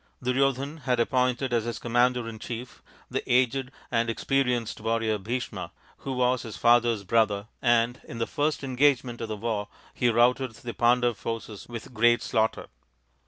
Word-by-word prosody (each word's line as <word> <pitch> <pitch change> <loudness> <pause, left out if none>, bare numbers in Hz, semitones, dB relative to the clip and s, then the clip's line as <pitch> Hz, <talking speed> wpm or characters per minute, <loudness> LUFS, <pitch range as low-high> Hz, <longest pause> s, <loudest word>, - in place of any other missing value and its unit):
Duryodhan 135 +3 +1
had 125 -2 +1
appointed 125 +1 +1
as 115 -2 +1
his 120 -1 -3
commander 120 0 +1
in 110 -1 -7
chief 120 +2 -7 0.3
the - - -1
aged 130 +1 +2 0.2
and 115 0 +1
experienced 125 -2 0
warrior 115 -1 0
Bhisma, 120 +5 -4 0.3
who 135 - -5
was 125 0 +1
his 115 -4 -8
father's 120 -3 +3
brother, 105 -1 +2 0.2
and 120 0 +2
in 115 - -8
the 115 - 0
first 150 +3 -1
engage 135 0 +3
ment 120 -2 -7
of 115 - -3
the 110 -1 -4
war 105 -1 -2 0.3
he 120 - +2
routed 120 +2 +3
the 120 +1 -7
Pandav 120 -1 +2
forces 115 -2 -6
with 120 +1 -8
great 120 +1 +4
slaughter. 110 0 0
120 Hz, 165 wpm, -27 LUFS, 115-125 Hz, 0.3 s, great